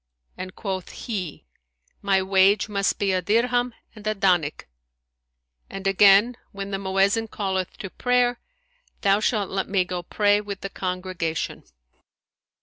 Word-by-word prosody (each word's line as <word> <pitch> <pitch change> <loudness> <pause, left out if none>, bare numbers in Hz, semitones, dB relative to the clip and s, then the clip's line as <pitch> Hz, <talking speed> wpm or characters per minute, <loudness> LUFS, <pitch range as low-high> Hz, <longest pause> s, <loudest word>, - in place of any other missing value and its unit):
and 185 +1 -7
quoth 190 -4 -4 0.2
he, 185 - -4 0.6
My 195 -1 +2
wage 195 +3 +4
must 200 -2 0
be 200 -1 +1
a 185 -1 +1
dirham 245 +4 +1 0.2
and 215 -1 -9
a 215 - +1
danik, 180 -6 +1 1.0
and 195 0 -7
again 200 +4 +5
when 200 0 -6
the 195 - -2
Mu'ezzin 195 +3 +1
calleth 190 -4 -3
to 195 - -7
prayer, 245 -1 +1 0.6
thou 200 +1 +4
shalt 210 -2 0
let 190 0 -2
me 190 -2 +2
go 180 0 -4
pray 205 +3 +2
with 200 -2 -7
the 195 - -5
congregation.' 180 -3 -3
195 Hz, 140 wpm, -24 LUFS, 190-210 Hz, 1.0 s, again